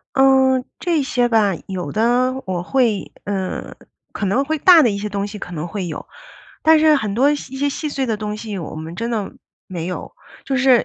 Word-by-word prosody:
嗯， 265 Hz, -1 st, +4 dB, 0.2 s
这 335 Hz, -4 st, +1 dB
些 245 Hz, -2 st, +1 dB
吧 210 Hz, -5 st, +3 dB
有 185 Hz, -2 st, -4 dB
的 245 Hz, +4 st, +2 dB
我 180 Hz, -2 st, -2 dB
会 230 Hz, -1 st, 0 dB
呃， 195 Hz, -2 st, -4 dB, 0.4 s
可 200 Hz, -, -3 dB
能 250 Hz, +9 st, +1 dB
会 310 Hz, +1 st, -1 dB
大 340 Hz, 0 st, +7 dB
的 235 Hz, -, +4 dB
一 200 Hz, -, -3 dB
些 210 Hz, +1 st, -3 dB
东 200 Hz, 0 st, -2 dB
西， 210 Hz, 0 st, -8 dB
可 180 Hz, -, -8 dB
能 160 Hz, +1 st, -4 dB
会 190 Hz, 0 st, -4 dB
有。 155 Hz, -, -6 dB, 0.6 s
但 320 Hz, 0 st, +6 dB
是 310 Hz, -1 st, +5 dB
很 215 Hz, -7 st, -1 dB
多 275 Hz, +5 st, +4 dB
一 -, -, +2 dB
些 275 Hz, 0 st, -3 dB
细 300 Hz, +2 st, -3 dB
碎 275 Hz, -2 st, -2 dB
的 225 Hz, -3 st, -1 dB
东 210 Hz, 0 st, -4 dB
西， 210 Hz, -3 st, -5 dB
我 160 Hz, -2 st, -6 dB
们 160 Hz, +2 st, -7 dB
真 230 Hz, +5 st, -3 dB
的 210 Hz, -4 st, -2 dB, 0.3 s
没 170 Hz, -2 st, -5 dB
有。 180 Hz, -, -5 dB, 0.3 s
就 270 Hz, -, -2 dB
是 255 Hz, -2 st, +4 dB
230 Hz, 225 characters per minute, -20 LUFS, 195-270 Hz, 0.6 s, 大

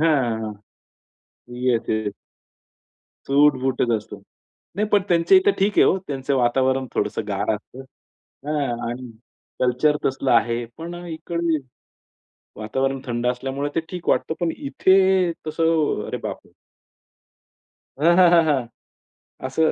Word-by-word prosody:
हां. 120 Hz, -9 st, +1 dB, 1.1 s
Yes, 120 Hz, -3 st, +2 dB
yes. 110 Hz, -2 st, -1 dB, 1.1 s
सूट-बूटच 135 Hz, -3 st, +2 dB
असतो. 105 Hz, -, -9 dB, 0.6 s
नाही, 210 Hz, +1 st, 0 dB
पण 205 Hz, -2 st, +3 dB
त्यांच्या 170 Hz, -, +4 dB
इथं 405 Hz, +2 st, +3 dB
ठीक 200 Hz, +1 st, +1 dB
आहे -, -, +8 dB
हो. 190 Hz, -, +3 dB
त्यांचं 135 Hz, -1 st, -2 dB
वातावरण 130 Hz, +2 st, +1 dB
थोडंसं -, -, -1 dB
गार -, -, -1 dB
असतं. 115 Hz, +5 st, -11 dB, 0.7 s
हां 140 Hz, -6 st, -2 dB
आणि 125 Hz, 0 st, -7 dB, 0.5 s
कल्चर 130 Hz, +4 st, +2 dB
तसलं 135 Hz, 0 st, 0 dB
आहे. 120 Hz, 0 st, +2 dB
पण 170 Hz, +2 st, -6 dB
इकडे 165 Hz, 0 st, -2 dB, 1.0 s
वातावरण 135 Hz, +5 st, -1 dB
थंड 120 Hz, 0 st, -2 dB
असल्यामुळे 135 Hz, +3 st, -2 dB
ते -, -, +3 dB
ठीक 180 Hz, -2 st, -5 dB
वाटतं. -, -, +1 dB
पण 170 Hz, -2 st, 0 dB
इथे 190 Hz, +5 st, +3 dB, 0.2 s
तसं, 160 Hz, 0 st, +1 dB
अरे, -, -, -3 dB
बापरे! -, -, -7 dB, 1.5 s
हां, 170 Hz, +3 st, +5 dB
हां, 180 Hz, -2 st, +7 dB
हां, 170 Hz, -2 st, +5 dB
हां. 135 Hz, -6 st, 0 dB, 0.8 s
असं 160 Hz, +4 st, +2 dB
140 Hz, 120 wpm, -22 LUFS, 125-165 Hz, 1.5 s, आहे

